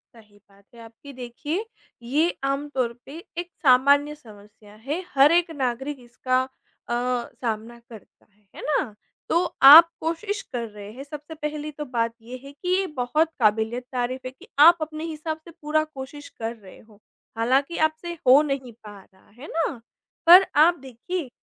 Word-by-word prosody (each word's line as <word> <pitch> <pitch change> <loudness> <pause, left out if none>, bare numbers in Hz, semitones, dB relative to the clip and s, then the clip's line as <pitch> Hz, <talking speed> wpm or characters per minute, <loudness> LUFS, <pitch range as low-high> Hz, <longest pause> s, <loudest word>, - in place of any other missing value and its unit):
सही 210 -2 -19
बात 200 0 -24
है 230 - -13
आपकी 230 +5 -13
देखिए, 290 - -5 0.4
ये 300 +8 +1
आमतौर 275 -3 -2
पे 285 +4 -10 0.2
एक 350 0 -4
सामान्य 285 +3 +4
समस्या 210 -4 -17
है 320 +6 -2
हर 275 +3 +6
एक 345 -1 +2
नागरिक 265 0 -3
इसका 255 +1 -1 0.5
अ, - - -1 0.5
सामना 230 0 -4
करता 220 -3 -15
है, 205 -1 -35
है - - -9
ना? 285 -7 -1 0.4
तो 335 - +3 0.3
आप 325 +5 +11
कोशिश 400 +6 -3
कर 235 -2 -3
रहे 205 0 -11
हैं 270 +3 -9
सबसे 300 +2 -9
पहली 300 0 -5
तो 295 0 -7
बात 230 -3 -1
ये 245 +3 -9
है 275 - -10
कि 360 +6 -7
ये 385 - -1
बहुत 305 +7 +1
काबिल-ए-तारीफ़ 245 +4 -1
है - - -7
कि 260 - -18
आप 340 +3 +8
अपने 310 0 -5
हिसाब 315 0 -5
से 335 - -12
पूरा 310 +1 +1
कोशिश 290 -1 -10
कर 225 +1 -4
रहे 195 -4 -16
हो, 215 -2 -21 0.4
हालाँकि 270 +8 +1
आपसे 340 +2 -8
हो 270 +4 +8
नहीं 260 -4 -4
पा 205 -1 -11 0.2
रहा 190 - -26
है 295 - -9
ना, 305 -7 -2 0.5
पर 365 +3 +10 0.2
आप 345 +1 +3
देखिए, 270 +4 -6
270 Hz, 170 wpm, -24 LUFS, 235-310 Hz, 0.5 s, आप